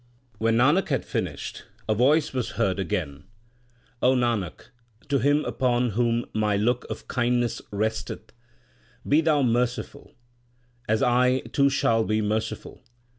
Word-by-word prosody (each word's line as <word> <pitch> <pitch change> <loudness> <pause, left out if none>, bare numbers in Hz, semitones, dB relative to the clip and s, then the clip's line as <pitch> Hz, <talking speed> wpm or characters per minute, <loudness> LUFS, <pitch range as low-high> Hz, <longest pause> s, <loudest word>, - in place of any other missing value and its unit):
When 115 0 +2
Nanak 145 +12 +3
had 135 -5 -1
finished, - - -4 0.3
a 110 - +2
voice 140 +8 +2
was 125 -3 -3
heard 100 -4 0
again: 80 -4 -3 0.8
O 130 +1 +4
Nanak, 115 -8 -2 0.4
to 140 -1 +2
him 145 +3 +2
upon 125 -2 0
whom 120 +2 0
My 105 -1 +1
look 120 +4 0
of - - -7
kindness 120 -1 0
resteth, 110 +1 -3 0.7
be 150 +3 +4
thou 155 -3 +2
merciful, 120 0 -2 0.7
as 110 0 +2
I 125 +1 +3
too 140 0 +1
shall 115 -4 +2
be 110 0 0
merciful. 110 +1 -3
120 Hz, 130 wpm, -25 LUFS, 110-130 Hz, 0.8 s, O